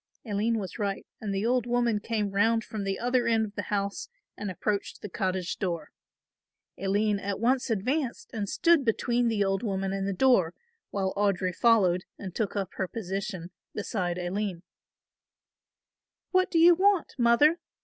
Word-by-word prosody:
Aline 220 +2 0
was 190 -5 -5
right 200 -2 -2
and 210 -2 -4
the 195 +2 -1
old 245 0 +1
woman 240 -3 +1
came 210 -2 -2
round 225 +3 +2
from 210 -2 -5
the 195 -1 -1
other 245 +1 +1
end 225 -1 +3
of 205 - -10
the 205 - -3
house 200 - -2 0.3
and 205 - -5
approached 200 +3 -2
the 210 - -5
cottage 185 -1 -2
door. 170 -6 -3 0.8
Aline 205 +2 +1
at 200 0 -3
once 250 +3 +1
advanced 250 +5 -1
and 205 -3 -3
stood 335 -4 +4
between 240 +1 +1
the 220 -3 +2
old 195 0 0
woman 195 -3 -2
and 195 0 -2
the - - 0
door, 190 -6 +3 0.3
while 190 -1 -1
Audry 195 -3 +1
followed 185 -5 +3
and 190 -3 -7
took 215 -1 -2
up 195 -3 -1
her 190 - -1
position 190 -3 -5 0.2
beside 185 -4 -2
Aline. 180 0 -3 1.7
"What 370 0 +3
do 335 - 0
you 340 +2 +8
want, 385 0 +2
mother?" 270 +8 +5
205 Hz, 165 wpm, -28 LUFS, 195-235 Hz, 1.7 s, you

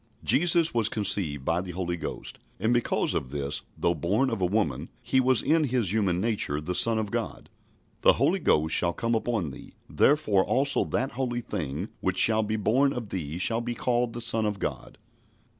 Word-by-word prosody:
" 110 - -33
Jesus 170 +1 +3
was 115 -2 +1
conceived 85 - -1
by 85 +2 0
the 90 -1 -7
Holy 90 -1 -3
Ghost, 85 - -7 0.2
and, 110 +5 +1
because 120 -1 0
of 65 - -3
this, 70 0 -3 0.2
though 85 - +1
born 105 +11 0
of 115 -4 -3
a 90 - +2
woman, 80 -7 -1
He 130 - +1
was 130 -1 +2
in 155 +2 +2
His 120 -7 0
human 95 -5 +1
nature 105 -9 0
the 75 +4 -4
Son 115 +4 +4
of 105 -2 -3
God. - - -5 0.5
"The - - +6
Holy - - +1
Ghost 80 +1 +1
shall 85 -1 +2
come 115 +5 -2
upon 110 - -1
thee... - - -13
therefore 105 - +2
also 140 +5 +1
that 130 +3 -2
holy 120 -2 -3
thing 80 - -5
which 95 0 -2
shall 110 +1 +4
be 110 0 -2
born 130 +7 +2
of 115 -4 -6
thee 80 -4 -5
shall 115 +6 0
be 120 0 -4
called 120 0 0
the 120 - -5
Son 110 -1 +3
of 105 -1 -3
God." - - -5
110 Hz, 200 wpm, -26 LUFS, 85-120 Hz, 0.5 s, The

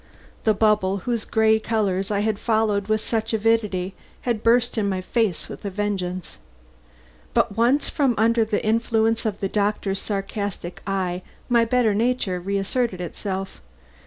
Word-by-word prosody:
The 215 -1 +4
bubble 205 -3 +2
whose 235 -3 -1
gay 220 0 +3
colors 200 -4 0
I 205 -1 +1
had 215 -1 0
followed 215 -3 +1
with 215 0 +1
such 225 0 -1
avidity 210 -4 +1 0.3
had 235 -4 -1
burst 240 +2 +3
in 210 -3 +1
my 190 -1 -1
face 195 -1 -1
with - - -9
a 200 - -2
vengeance. 185 -3 -3 1.0
But 200 - +2
once 245 +6 +3
from 275 -6 +1
under 230 +2 +4
the 215 -1 -1
influence 225 0 +2
of 205 -2 -4
the 195 - +1
doctor's 200 -1 0
sarcastic 200 -3 -4
eye, 185 -2 -1 0.3
my 235 -1 +4
better 230 -2 +2
nature 220 -4 0
reasserted 200 +3 -1
itself. 190 - -5
210 Hz, 150 wpm, -23 LUFS, 195-225 Hz, 1.0 s, The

